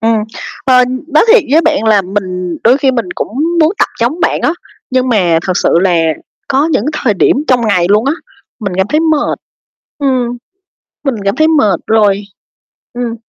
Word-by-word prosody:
Ừm, 225 0 +2 0.5
ờ, 255 -1 +5 0.2
nói 310 +5 +3
thiệt 475 - +5
với 310 +3 +5
bạn 300 -6 0
là 215 -3 +3
mình 185 -3 -4
đôi 250 +4 +5
khi 270 -2 +2
mình 235 -4 -1
cũng - - -3 0.3
muốn 315 +4 +3
tập - - +2
giống 265 +9 -1
bạn - - +1
á, 300 - +2 0.4
nhưng 255 0 +1
mà, 180 -8 +2
thật 185 - +1
sự - - +1
là 185 -2 +2 0.5
có 280 +2 +2
những 210 - +1
thời 250 -8 0
điểm 190 - +2
trong 250 -2 +3
ngày 180 -4 +2
luôn 210 +2 +3
á, 275 - +1 0.5
mình 200 -3 -3
cảm 190 - +1
thấy 305 +2 +1
mệt, 315 -2 0 0.6
ừm, 255 -4 -1 0.7
mình 275 -4 -1
cảm 195 - 0
thấy 315 - +3
mệt 270 - +2
rồi, 205 -2 +2 0.7
ừm. 240 -1 -3
240 Hz, 185 wpm, -12 LUFS, 200-280 Hz, 0.7 s, ờ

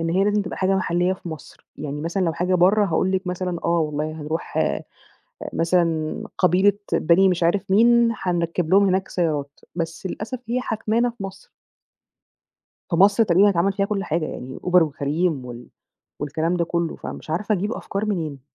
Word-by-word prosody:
إن 165 0 -1
هي 190 +3 +2
لازم 205 0 +2
تبقى 185 - -6
حاجة 190 +1 +2
محليّة 180 0 +1
في 180 -2 -8
مصر. 160 -1 -10
يعني 145 0 -5
مثلًا 170 +4 -1
لو 165 - +1
حاجة 180 +2 0
برّه، 195 +4 +4
هاقول 185 +2 +1
لِك 190 0 -1
مثلًا 180 -1 -2
آه 170 0 +2
والله 150 0 -2
هنروح 155 +2 -4 1.0
مثلًا 165 -2 0
قبيلة 185 +2 +4 0.2
بني 185 +4 +4
مش 175 -1 0
عارف 190 +3 +1
مين، 235 +3 +5
هنركّب 170 -2 -1
لهم 200 +1 +6
هناك 190 0 +1
سيارات، 150 -5 -2 0.2
بس 165 +2 -4
للأسف 220 +7 -5
هي 250 +1 0
حاكمانا 225 +1 0
في 230 -4 -9
مصر. 195 0 -9 1.4
فمصر 200 +6 +5
تقريبًا 195 +2 +4
اتعمل 195 +1 +1
فيها 195 0 0
كل 200 -1 -2
حاجة 160 -3 -1
يعني 130 -3 -7
Uber 180 -1 +5
وCareem 150 -1 -1
وال 120 0 -9 0.5
والكلام 160 +4 -1
ده 170 - +1
كُلّه 170 -1 -2
فمش - - -8
عارفة 205 +6 0
أجيب 205 +5 -2
أفكار 200 +1 -4
منين؟ 160 -9 -3
180 Hz, 170 wpm, -22 LUFS, 165-195 Hz, 1.4 s, لهم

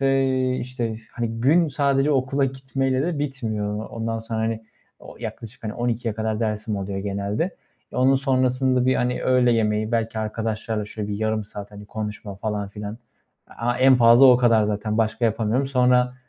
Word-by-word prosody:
ve, 135 -1 +3 0.3
işte, 120 -3 -3 0.2
hani, 115 -1 -3
gün 160 +6 +4
sadece 140 0 +1
okula 135 0 +1
gitmeyle 135 0 -1
de 160 -1 -1
bitmiyor. 110 -7 -3
Ondan 115 0 -3
sonra, 110 0 -4
hani, 110 0 -2 0.4
o - - -13
yaklaşık 115 +1 -8 0.2
12.00'ye 120 -2 -1
kadar 110 0 -2
dersim 105 -1 -2
oluyor 95 0 -4
genelde. 100 - -2 0.4
E, - - -7
onun 130 +2 +4
sonrasında, 130 -1 +1
bir, 130 - +4
hani, 125 0 -1
öğle 125 -1 +3
yemeği 110 0 0
belki 115 -1 -1
arkadaşlarla 110 0 -2
şöyle 105 -1 -6
bir 105 - -2
yarım 110 0 -1
saat, 105 0 -9
hani, 105 0 -11
konuşma 105 -1 -6
falan 105 0 -3
filan, 105 +2 -7 0.6
a 120 +1 0
en 130 +1 +6
fazla 120 +2 +7
o 125 - +8
kadar 115 -3 +4
zaten, 105 +1 -2
başka 110 +1 0
yapamıyorum. 115 +4 +1
Sonra, 125 -1 +3
115 Hz, 165 wpm, -23 LUFS, 110-130 Hz, 0.6 s, o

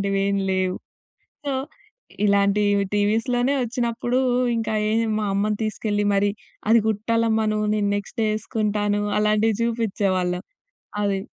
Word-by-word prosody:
అలాంటివేం 200 0 0 0.2
లేవు. 185 -1 0 0.7
సో 275 - 0 0.7
ఇలాంటి 200 0 +3 0.3
టీవీస్‌లోనే 230 +6 +1
వచ్చినప్పుడు 240 +1 -1 0.4
ఇంకా 225 -1 -2 0.2
ఏం 225 +1 +2 0.2
మా 210 - -1
అమ్మని 210 +1 +1
తీసుకెళ్ళి, 210 -1 -1
మరి 200 +1 +2 0.4
అది 230 0 +6
కుట్టాలమ్మ 220 +1 +1
నువ్వు 215 0 0
నేను 205 -1 +1
నెక్స్టే 220 +3 -2
వేసుకుంటాను 210 -1 -1 0.2
అలాంటివి 215 0 +2
చూపించేవాళ్ళం. 195 -6 0 0.6
అది. 195 -1 0
210 Hz, 110 wpm, -23 LUFS, 200-225 Hz, 0.7 s, అది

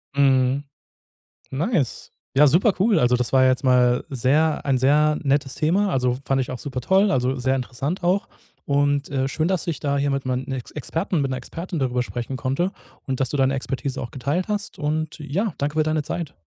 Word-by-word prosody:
Mhm. 135 -1 +3 0.9
Nice. 150 - -1 0.2
Ja, 145 +2 +7
super 180 - +4
cool. 205 0 +3
Also, 125 -2 +3
das 125 -1 -1
war 130 -1 +6
ja 130 - +5
jetzt 130 +2 0
mal 125 -1 +3
sehr 145 +5 +1
ein 135 -2 +2
sehr 150 +3 +3
nettes 140 -1 0
Thema, 190 +6 +1
also, 125 -3 +1
fand 135 -1 +1
ich 125 - -4
auch 130 - -4
supertoll, 190 - +1
also, 130 -3 +1
sehr 130 +1 0
interessant 135 +7 -3
auch. 185 +3 +1 0.4
Und, 145 0 +1
äh, 135 -1 0
schön, 155 +4 -1
dass 185 -3 -1
ich 165 - -2
da 140 -1 0
hier 140 0 +1
mit 135 -1 -2
mein 130 0 -2
Ex 130 -3 -5
Experten 160 +3 -2
mit 135 - -1
'ner 130 - -2
Expertin 165 +6 -6
darüber 125 -2 0
sprechen 125 +2 -4
konnte 140 +9 -1 0.3
und 130 -1 -3
dass 130 -2 0
du 145 - -2
deine 135 0 +2
Expertise 135 0 -3
auch 120 - -5
geteilt 145 +8 -2
hast. 205 -1 -3
Und 155 +1 -2
ja, 170 +7 -2
danke 145 +2 -2
für 155 - +4
deine 155 0 0
Zeit. 155 +1 -5
140 Hz, 205 wpm, -23 LUFS, 130-155 Hz, 0.9 s, Ja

